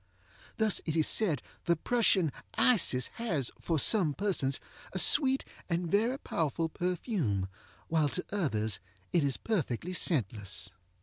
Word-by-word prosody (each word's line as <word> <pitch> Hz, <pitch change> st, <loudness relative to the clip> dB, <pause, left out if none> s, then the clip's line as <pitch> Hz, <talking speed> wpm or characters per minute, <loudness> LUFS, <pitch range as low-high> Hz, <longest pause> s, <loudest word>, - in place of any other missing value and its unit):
Thus 220 Hz, -3 st, +2 dB
it 155 Hz, -, -1 dB
is 160 Hz, -2 st, +3 dB
said 170 Hz, -, +1 dB, 0.2 s
the 170 Hz, -, +3 dB
Prussian 190 Hz, -, +2 dB, 0.2 s
Isis 170 Hz, -, +3 dB
has, 165 Hz, -, -1 dB
for 165 Hz, -, -1 dB
some 160 Hz, -2 st, +3 dB
persons, 165 Hz, -10 st, 0 dB, 0.3 s
a -, -, -2 dB
sweet 270 Hz, -, +4 dB, 0.2 s
and 170 Hz, -1 st, -1 dB
very 225 Hz, +6 st, +2 dB
powerful 165 Hz, -, -1 dB
perfume, 170 Hz, -, -1 dB, 0.4 s
while 155 Hz, -3 st, +2 dB
to 180 Hz, -, -2 dB
others 110 Hz, -, -1 dB, 0.3 s
it 170 Hz, -, +3 dB
is 140 Hz, -2 st, +1 dB
perfectly 180 Hz, -, -2 dB
scentless. 105 Hz, -, -1 dB
170 Hz, 130 wpm, -31 LUFS, 140-205 Hz, 0.4 s, sweet